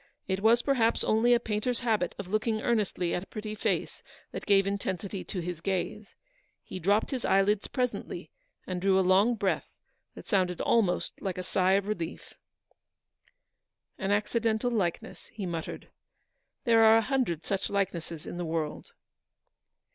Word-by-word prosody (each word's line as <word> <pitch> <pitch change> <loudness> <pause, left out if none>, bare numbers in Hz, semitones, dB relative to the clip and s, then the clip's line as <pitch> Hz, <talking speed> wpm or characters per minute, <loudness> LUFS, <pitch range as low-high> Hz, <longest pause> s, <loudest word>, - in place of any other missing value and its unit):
It 190 0 0
was 230 +3 +4
perhaps 235 -5 +2
only 225 +3 +3
a - - +2
painter's 230 +2 -2
habit 215 -7 0
of 200 - -6
looking 215 +2 0
earnestly 210 -7 0
at 180 - -1
a 195 - -11
pretty 215 0 -6
face 215 - -2 0.3
that - - -7
gave 195 -1 +5
intensity 195 -1 -3
to 185 - -4
his 170 -1 -5
gaze. 195 +3 -3 0.5
He 185 - -7
dropped 205 - +2
his 255 -3 -3
eyelids 195 +1 +2
presently, 250 -2 -3 0.3
and 180 -1 -4
drew 190 0 +3
a 190 - +2
long 200 +6 +4
breath, 200 -3 -1 0.5
that - - -10
sounded 185 -4 +1
almost 210 -6 +1
like 190 -3 -3
a 185 - -3
sigh 185 0 +2
of 200 0 +2
relief. 175 -6 -4 1.7
"An 195 - -2
accidental 220 +3 +1
likeness," 190 -7 -2
he 210 -4 -6
muttered; 165 -2 -5 0.7
"there 230 -1 +5
are 220 0 +8
a - - +4
hundred 245 - -1
such 195 0 -1
likenesses 170 -5 -2
in - - -6
the 175 - -2
world." 160 -2 -3
200 Hz, 155 wpm, -29 LUFS, 185-220 Hz, 1.7 s, are